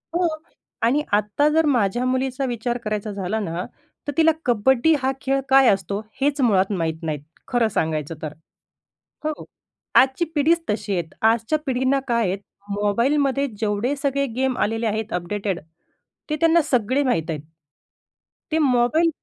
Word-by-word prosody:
हो 350 0 +3 0.6
आणि 255 +6 +3
आता 210 +8 +2
जर 320 +1 +3
माझ्या 240 -3 +1
मुलीचा 260 +1 0
विचार 240 -1 -2
करायचा 210 0 -3
झाला 200 +2 -2
ना, 180 -3 -3 0.4
तर - - 0
तिला 325 0 +6
कबड्डी 250 +6 +3
हा 265 0 +1
खेळ 270 +1 +1
काय 270 -1 +6
असतो 200 0 0 0.2
हेच 285 +1 +1
मुळात 200 -5 +3
माहीत 160 -1 -2
नाही, 155 -2 -2 0.3
खरं 240 -3 +2
सांगायचं 160 -4 -2
तर. 155 -1 -5 0.9
हो, 310 -1 -3 0.5
आजची 265 +6 +4
पिढीच 330 +4 +3
तशी 210 -1 -1
आहेत. 170 -3 -3
आजच्या 225 +6 +2
पिढींना 260 0 +1
काय 235 -3 +1
आहेत 190 +2 -2 0.3
मोबाईलमध्ये 265 +8 +1
जेवढे 215 +5 0
सगळे 280 0 0
गेम 260 -1 0
आलेले 225 +2 0
आहेत 215 0 -2
अपडेटेड, 190 +1 -2 0.7
ते 305 - 0
त्यांना 330 0 +5
सगळे 260 0 +1
माहीत 180 - 0
आहेत. 155 -3 -3 1.1
ते 315 - +2
मोबाईल 280 +4 +3
240 Hz, 145 wpm, -22 LUFS, 205-275 Hz, 1.1 s, तिला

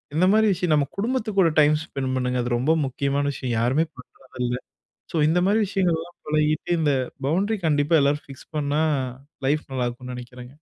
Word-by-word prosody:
இந்த 180 - +4
மாரி 220 0 +4
விஷயம் 175 -3 +1
நம்ம 145 -2 +2
குடும்பத்து 230 +1 -1
கூட 175 - +6
டைம் 150 0 +5
ஸ்பெண்ட் 130 -4 -3
பண்ணுங்க. 125 0 0
அது 120 - -3
ரொம்ப 145 +7 +2
முக்கியமான 140 +2 -1
விஷயம் 125 -4 -3
யாருமே 130 +8 +2
பண்ணுறதில்ல. 125 -1 -5 0.6
ஸோ 165 - 0
இந்த 170 +3 +3
மாரி 210 +3 +3
விஷயங்கள்லாம் 175 -3 -1
பழகிட்டு, 155 +2 0
இந்த 150 -2 +2 0.4
பவுன்டரி 200 +8 +1
கண்டிப்பா 145 +1 +2
எல்லாரும் 145 +2 +1
ஃபிக்ஸ் 135 -1 -13
பண்ணா 150 +1 +1 0.6
லைஃப் 150 +2 +1
நல்லாருக்கும்னு 125 0 -3
நெனைக்கிறேங்க. 125 0 -9
145 Hz, 165 wpm, -24 LUFS, 130-165 Hz, 0.6 s, கூட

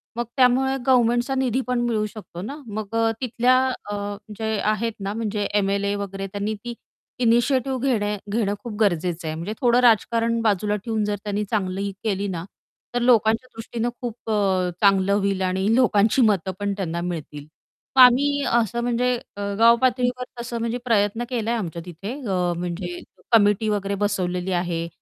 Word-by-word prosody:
मग 240 - -1
त्यामुळे 260 +1 +4
गव्हर्नमेंटचा 245 +1 +3
निधी 260 -1 +1
पण 250 -1 0
मिळू 225 -3 0
शकतो 205 -5 -9
ना. 270 +9 -5
मग 215 +1 -5
अ, 225 0 +2
तिथल्या 250 +1 +2 0.4
अ, - - -2 0.4
जे 220 -1 -1
आहेत 225 +1 -1
ना, 200 +1 -3
म्हणजे 210 -2 -2
एम-एल-ए 200 0 +1
वगैरे 195 -1 -5
त्यांनी 205 +2 -3
ती 240 0 -5 0.5
इनिशिएटिव्ह 255 +3 +2
घेणे 210 -5 0
घेणं 210 -2 0
खूप 235 -3 -6
गरजेचं 175 -4 0
आहे. 155 - -3
म्हणजे 170 +7 -4
थोडं 245 -1 +4
राजकारण 230 0 +3
बाजूला 210 -1 +1
ठेऊन 220 -2 0
जर 205 0 -1
त्यांनी 205 0 -2
चांगली 195 -3 -1
ही 200 - -2
केली 200 -2 -1
ना, 170 -3 -4 0.5
तर 245 - +1
लोकांच्या 230 0 +3
दृष्टीनं 230 +1 -3
खूप 235 -2 -6
अ, 190 -3 +1
चांगलं 195 -1 +4
होईल 200 -1 0
आणि 190 +3 +1
लोकांची 230 -1 +3
मतं 190 -1 -2
पण 200 0 -1
त्यांना 170 -3 -3
मिळतील. 155 -4 -5 0.6
आम्ही 285 +3 +3
असं 235 0 +1
म्हणजे 245 +1 +1 0.2
अ, - - -5 0.2
गावपातळीवर 245 +2 +3 0.2
तसं 235 0 -4
म्हणजे 235 +1 -2
प्रयत्न 225 0 +1
केला 230 -3 -2
आहे 235 - 0
आमच्या 170 -3 -5
तिथे, 180 +6 -6
अ, 180 -2 0
म्हणजे 175 0 -4 0.3
कमिटी 210 -1 +4
वगैरे 200 -1 -1
बसवलेली 180 -2 -1
आहे. 170 -1 -3
215 Hz, 165 wpm, -23 LUFS, 195-235 Hz, 0.6 s, त्यामुळे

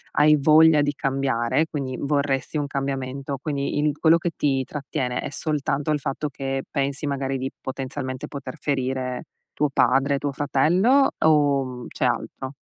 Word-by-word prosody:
hai 150 +1 +6
voglia 155 +1 +6
di 145 - +1
cambiare, 135 0 0
quindi 135 -4 -4
vorresti 140 0 0
un 145 -1 -1
cambiamento, 135 0 -3
quindi 145 -1 -2
il 150 -1 +1
quello 165 0 +5
che 170 +1 -2
ti 135 -2 +1
trattiene, 135 -3 -3
è - - -4
soltanto 145 -1 -1
il 150 - +1
fatto 145 +2 -3
che 135 0 -3
pensi 140 0 -2
magari 135 -1 -1
di, 130 +1 -3
potenzialmente, 130 0 -5
poter 140 -3 -7
ferire 130 -2 -2 0.3
tuo 150 0 +1
padre, 135 +3 +3
tuo 145 0 -2
fratello 180 - +3 0.2
o, 145 -3 +4
mhmm, 125 -1 -7
c'è - - -2
altro? 130 +1 -2
140 Hz, 155 wpm, -24 LUFS, 135-150 Hz, 0.3 s, hai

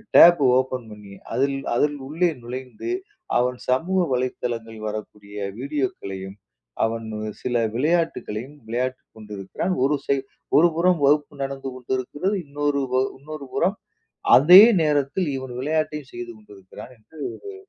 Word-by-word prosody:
tape 170 -2 +9 0.2
open 130 -2 -1
பண்ணி 105 -2 -11 0.2
அதில் 140 +1 +1 0.2
அதில் 145 +4 +2
உள்ளே 165 +5 +1
நுழைந்து, 130 - -6 0.5
அவன் 125 +1 +1
சமூக 170 +9 +2
வலைத்தளங்கள் 120 -3 -3
வரக்கூடிய 105 -1 -7 0.2
வீடியோக்களையும், 120 -9 -4 0.5
அவன் 115 0 -3 0.4
சில 125 - -2 0.2
விளையாட்டுக்களையும் 145 -4 -1
விளையாட்டுக் 130 +3 -3
கொண்டிருக்கிறான், 105 - -4
ஒரு 145 +1 +2
சைட் 135 -1 0 0.3
ஒரு 170 +3 +6
புறம் 175 0 +3
வகுப்பு 145 +1 +2
நடந்து 135 0 -4
கொண்டிருக்கிறது, 130 - -2
இன்னொரு 145 0 -1 0.4
இன்னொரு 150 0 -8
புறம் 190 +4 +2 0.6
அதே 175 +8 +10 0.2
நேரத்தில் 150 +3 +1
இவன் 130 -1 -7
விளையாட்டையும் 150 0 -2
செய்து 120 0 -6
கொண்டிருக்கிறான் 105 +2 -13
என்று 110 +9 -20 0.3
ஒரு 400 - -7
130 Hz, 120 wpm, -23 LUFS, 120-150 Hz, 0.6 s, அதே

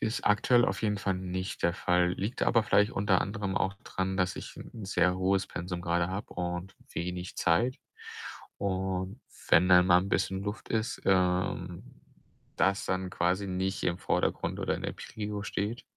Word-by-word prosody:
ist 110 +1 -2
aktuell 120 +4 +5
auf - - -2
jeden 105 -2 +1
Fall 95 0 0
nicht 95 0 -4
der 85 - +2
Fall. 90 0 +2
Liegt 105 +7 -3
aber 115 -2 +4
vielleicht 105 +1 +3
unter 100 -2 +2
anderem 100 -1 -2
auch 95 - +1
dran, 95 0 -2
dass, 90 -1 0
ich - - -8
'n 110 -4 -9
sehr 90 -1 +2
hohes 95 +1 +1
Pensum 90 0 -5
grade 85 0 +1
habe 95 +4 -5
und 90 +2 -3 0.2
wenig 90 +1 -4
Zeit. 95 +10 +2 0.8
Und 95 +2 -2 0.3
wenn 90 +2 +6
dann 90 -1 +7
mal 90 -1 +7
'n 95 - -4
bisschen 95 +1 0
Luft 105 +2 -5
ist, 110 +1 -1
ähm, 95 +1 +1 0.7
das 100 +1 +2
dann 95 0 -1
quasi 90 +4 0
nicht 95 +1 -2
im 85 0 0
Vordergrund - - 0
oder - - 0
in - - -8
der - - -2
Prio 105 -1 -5
steht. 105 +3 -3
95 Hz, 175 wpm, -30 LUFS, 90-100 Hz, 0.8 s, dann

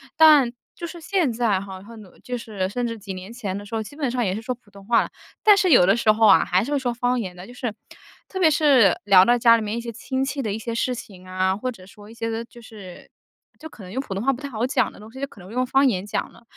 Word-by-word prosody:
但 300 -6 +6 0.2
就 340 - -6
是 340 0 -9
现 330 -8 0
在 220 -5 +1
哈， 190 -1 -9
和 230 +3 -13
努 210 -4 -14
就 250 -1 -5
是 200 -5 -4
甚 245 +3 -2
至 230 -2 -4
几 195 -2 -7
年 185 +5 -9
前 200 -6 -4
的 205 - -8
时 225 - -13
候， 220 - -1
基 220 +7 -10
本 280 -5 -2
上 245 -1 -1
也 190 -1 -1
是 220 - -5
说 255 - -2
普 235 -4 -20
通 200 0 -15
话 235 +1 +3
了。 - - -4 0.3
但 420 -2 +7
是 370 -4 +2
有 180 -9 +7
的 200 +4 +4
时 220 -2 +4
候 220 0 +4
啊， - - +6
还 185 +3 +2
是 280 - -5
会 290 - +2
说 245 -3 -2
方 245 +1 0
言 185 -5 -5
的， 180 +1 -10
就 245 - -12
是 240 -4 -4 0.5
特 380 - -6
别 330 -3 +5
是 275 -9 +4
聊 190 -2 +7
到 240 - +4
家 230 -1 +6
里 225 - -1
面 210 +2 -3
一 - - -3
些 235 0 -6
亲 260 +4 -3
戚 275 0 -3
的 215 - -2
一 - - -3
些 230 +1 -5
事 250 +2 0
情 185 -5 -11
啊， 185 +1 0
或 255 +3 -3
者 185 -5 -14
说 205 +1 -15
一 - - -12
些 230 0 -4
个 225 +1 -3
就 240 - -16
是 205 -6 -12 0.5
就 315 0 -9
可 210 - -13
能 180 - -10
用 260 +4 -2
普 195 -8 -7
通 200 - -3
话 270 +1 +2
不 255 - -9
太 280 - -5
好 230 0 -2
讲 260 - 0
的 - - -16
东 215 +1 -13
西， 265 +2 -10
就 275 - -2
可 210 - -17
能 185 +4 -12
用 250 +2 0
方 270 +2 +3
言 190 -6 0
讲 - - -3
了。 - - -19
230 Hz, 335 characters per minute, -23 LUFS, 200-255 Hz, 0.5 s, 但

